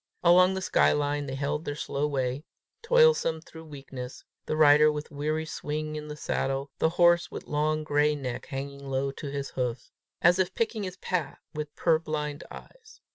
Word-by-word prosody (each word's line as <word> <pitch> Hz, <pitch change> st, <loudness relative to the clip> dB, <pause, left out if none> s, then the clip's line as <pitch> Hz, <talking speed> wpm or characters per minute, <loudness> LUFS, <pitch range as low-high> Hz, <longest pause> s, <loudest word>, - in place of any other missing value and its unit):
Along 180 Hz, +2 st, +6 dB
the 190 Hz, -, -3 dB
sky -, -, +3 dB
line 145 Hz, 0 st, -1 dB
they 135 Hz, -, -4 dB
held 145 Hz, +3 st, -2 dB
their 145 Hz, -, -4 dB
slow 145 Hz, 0 st, -2 dB
way, 135 Hz, -1 st, -2 dB, 0.4 s
toilsome 475 Hz, -, +4 dB
through 160 Hz, 0 st, -13 dB
weakness, 135 Hz, -4 st, -8 dB, 0.2 s
the -, -, -1 dB
rider 150 Hz, 0 st, +7 dB
with 150 Hz, 0 st, -6 dB
weary 155 Hz, +2 st, -2 dB
swing 155 Hz, 0 st, -4 dB
in 150 Hz, 0 st, -6 dB
the 150 Hz, -, -6 dB
saddle, 135 Hz, -1 st, -2 dB
the 160 Hz, -, +3 dB
horse 175 Hz, 0 st, +5 dB
with -, -, -8 dB
long 155 Hz, +1 st, 0 dB
gray 150 Hz, 0 st, +2 dB
neck 130 Hz, -4 st, -5 dB
hanging 140 Hz, +1 st, -6 dB
low 135 Hz, +1 st, 0 dB
to 145 Hz, +2 st, -8 dB
his 140 Hz, 0 st, -4 dB
hoofs, 125 Hz, -1 st, -3 dB, 0.3 s
as 175 Hz, +2 st, +4 dB
if 185 Hz, 0 st, 0 dB
picking 225 Hz, -1 st, -1 dB
his 185 Hz, -1 st, -5 dB
path 180 Hz, -5 st, -2 dB, 0.2 s
with 150 Hz, -1 st, -5 dB
purblind 155 Hz, -3 st, 0 dB
eyes. 480 Hz, -3 st, -14 dB
150 Hz, 180 wpm, -28 LUFS, 140-165 Hz, 0.4 s, rider